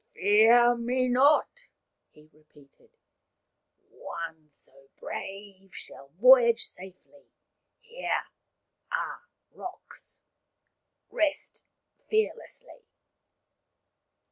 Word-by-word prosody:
" - - -46
Fear 230 +4 +5
me 250 +2 -1
not," 285 - +2 0.4
he 150 0 -21
repeated. 150 -2 -24 0.6
" - - -48
One 160 -2 -8
so 135 -1 -17
brave 195 -1 -9
shall 135 - -11
voyage 235 -1 +6
safely. 190 +10 -12 0.5
Here 480 +1 -3 0.7
are - - -4 0.3
rocks. 365 0 -7 0.9
Rest 305 -2 +1 0.5
fearlessly." 450 +3 -1
230 Hz, 75 wpm, -27 LUFS, 170-270 Hz, 0.9 s, voyage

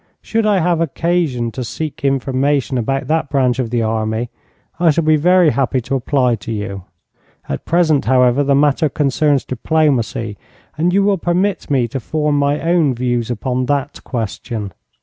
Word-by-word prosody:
Should 225 -1 0
I 205 -2 +3
have 175 -1 +1
occasion 160 -7 -1
to 125 - -5
seek 150 +6 -6
information 135 0 0
about 135 +4 -1
that 155 -2 0
branch 130 -3 +1
of 125 -3 -1
the 120 -1 0
army, 110 +1 -2 0.5
I 170 -1 +4
shall 160 +2 +2
be 155 0 +4
very 175 +1 +4
happy 135 -1 0
to 120 - -5
apply 130 -2 +1
to 110 - -8
you. 100 -3 -5 0.6
At 70 - -5
present, 160 -4 +2
however, 125 +2 +3
the 140 0 +2
matter 145 +2 +2
concerns 145 0 +1
diplomacy, 130 - 0 0.4
and 170 +3 +1
you 195 +2 +3
will 200 -2 +2
permit 180 +4 -1
me 130 -4 +2
to 135 - -4
form 150 +4 -1
my 145 +1 +1
own 165 -5 +2
views 120 -1 -1
upon 125 +2 -2
that 140 0 -1
question. 110 -3 -4
135 Hz, 170 wpm, -17 LUFS, 120-155 Hz, 0.6 s, I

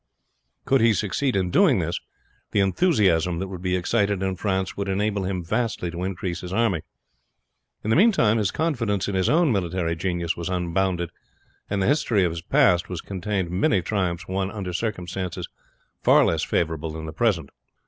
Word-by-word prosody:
Could 135 -2 +3
he 115 -1 +5
succeed 115 +6 0
in 95 -2 0
doing - - +5
this - - -1 0.5
the - - +3
enthusiasm 95 - +2
that 95 +2 -4
would 90 -2 -7
be 90 0 0
excited 100 +1 0
in 95 -1 -1
France 95 0 -1
would 100 -1 -3
enable 100 0 0
him 90 -2 -2
vastly 105 -2 -1
to 85 +2 -5
increase 90 -2 -3
his 90 - -7
army. 100 -5 +1 1.0
In 110 - -1
the - - +4
meantime 155 - +4
his 105 -3 +1
confidence 115 - -1
in 100 - -2
his 95 -1 +1
own 165 -2 +4
military 90 -4 -1
genius 85 -1 -2
was 85 +1 -4
unbounded, 90 -1 -1 0.6
and 100 -1 0
the - - +1
history 120 -8 +2
of 85 - +1
his 85 0 -5
past 85 +1 +3
was 90 -3 -4
contained 95 -2 -3
many 95 0 +2
triumphs 90 -3 -2
won 95 0 -1
under 100 -4 -5
circumstances 90 -3 -3 0.5
far - - +5
less - - +1
favorable 80 -1 -1
than 80 0 -6
the 80 - -6
present. 85 -8 0
95 Hz, 180 wpm, -24 LUFS, 85-105 Hz, 1.0 s, he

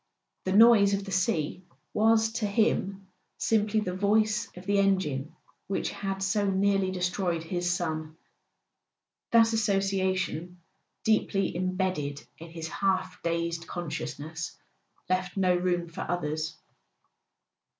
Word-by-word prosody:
The 190 - 0
noise 205 -2 +7
of 200 0 -4
the 195 - -7
sea 180 -2 0 0.3
was 220 +1 +3
to 225 -2 -1
him 200 -2 0 0.3
simply 215 -1 +2
the 180 -3 -3
voice 215 +3 +2
of 180 - -10
the 200 0 +2
engine 175 -8 0 0.3
which 195 - -1
had 195 -1 -3
so 200 +1 +1
nearly 195 0 +2
destroyed 180 -2 -1
his 175 +1 -2
son: 160 -3 -2 1.1
that 230 -1 +5
association, 190 -4 0 0.4
deeply 210 -4 +1
imbedded 185 -6 -2
in 165 +1 -9
his 165 -1 -6
half 190 +2 -1
dazed 170 0 -2
consciousness, 160 -1 -5 0.5
left 185 +1 -1
no 185 -2 +3
room 175 -1 0
for 165 - -7
others. 155 -2 -2
185 Hz, 120 wpm, -28 LUFS, 170-200 Hz, 1.1 s, noise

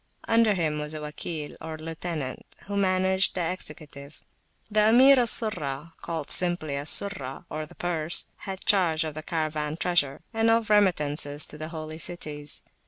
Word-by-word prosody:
Under 225 -2 +3
him 155 -4 -1
was 150 +1 -4
a - - -4
Wakil, 150 0 -5
or 160 0 -6
lieutenant, 160 -3 -5 0.2
who 200 +4 -6
managed 190 -1 +2
the 175 -2 -1
executive. 150 -4 -8 0.5
The 215 0 +4
Emir 260 +3 +7
al 240 - +2
Surrahcalled 165 - -1
simply 175 -5 +3
Al 140 +1 -3
Surrah, 150 -12 +3
or 155 0 -4
the - - -17
Pursehad 175 +3 -2
charge 180 -7 +3
of 155 -1 -5
the 155 - -6
Caravan 155 -1 -3
treasure, 155 -6 +1
and 225 0 +2
of 225 -1 +2
remittances 150 -7 +2
to - - -9
the 155 - -5
Holy 155 -1 -7
Cities. 150 -4 -3
160 Hz, 155 wpm, -26 LUFS, 150-190 Hz, 0.5 s, Emir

